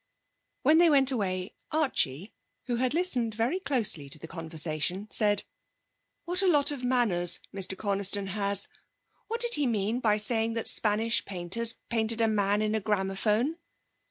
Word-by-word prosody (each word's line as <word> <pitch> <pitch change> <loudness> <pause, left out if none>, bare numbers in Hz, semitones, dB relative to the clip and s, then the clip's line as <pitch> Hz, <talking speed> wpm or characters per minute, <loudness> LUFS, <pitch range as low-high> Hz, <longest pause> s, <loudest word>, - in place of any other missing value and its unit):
When 305 +4 +5
they 345 -1 +5
went 275 -3 +3
away 185 -5 -3 0.2
Archie, 215 - -1 0.3
who 245 -2 -2
had 255 +3 -1
listened 250 -11 +1
very 240 - -1
closely 225 - +2
to 145 - -2
the 160 - -10
conversation, 165 +3 -3
said: 205 -1 +2 0.8
'What 360 +2 -1
a 385 - +2
lot 290 -4 +3
of 275 -3 -6
manners 215 -9 +1
Mr 190 -1 -1
Coniston 200 0 0
has! 200 0 0 0.6
What 460 +1 -4
did 475 -1 +4
he 290 -2 +2
mean 220 +1 -1
by 215 -4 +1
saying 225 +1 +2
that 230 -1 -3
Spanish 220 +2 +2
painters 195 +5 -1
painted 225 0 -1
a 225 - +3
man 205 -1 +1
in 215 0 -1
a 220 - 0
gramophone?' 210 +7 -1
220 Hz, 155 wpm, -28 LUFS, 195-255 Hz, 0.8 s, When